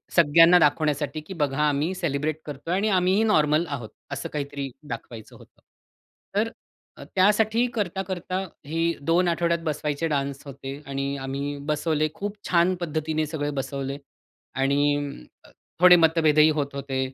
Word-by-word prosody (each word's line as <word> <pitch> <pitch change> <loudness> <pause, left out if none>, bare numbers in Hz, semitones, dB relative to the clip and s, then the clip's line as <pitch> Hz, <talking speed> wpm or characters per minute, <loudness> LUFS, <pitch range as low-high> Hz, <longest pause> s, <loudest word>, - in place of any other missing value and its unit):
सगळ्यांना 165 +2 +7
दाखवण्यासाठी, 150 -1 +1
की 155 +5 -9
बघा, 145 -5 -1
आम्ही 150 +5 0
सेलिब्रेट 155 -3 -2
करतोय 150 +3 -5
आणि 205 +3 +1
आम्हीही 190 +2 +3
नॉर्मल 155 -6 +3
आहोत. 130 -7 -5 0.2
असं - - -4
काहीतरी 140 -2 -4 0.2
दाखवायचं 115 -2 -8
होतं. - - -19 0.7
तर 220 +3 +1 0.5
अ, - - -9
त्यासाठी 215 +4 +3
करता-करता 185 -3 -3 0.3
हे 165 +2 -2 0.2
2 170 +4 +2
आठवड्यात 170 0 +1
बसवायचे 150 0 -2
डान्स 140 -2 -2
होते 135 0 -7
आणि 140 0 -2
आम्ही 140 +2 -4
बसवले. 155 0 +1
खूप 205 +1 -5
छान 175 +1 +3
पद्धतीने 155 -1 -1
सगळे 145 -1 -3
बसवले 135 0 -4 0.6
आणि 145 +2 +2 0.5
अं, - - -17 0.3
थोडे 180 0 +9
मतभेदही 160 -2 +4
होत 140 -1 -3
होते. 135 -1 -3
155 Hz, 135 wpm, -25 LUFS, 140-175 Hz, 0.7 s, थोडे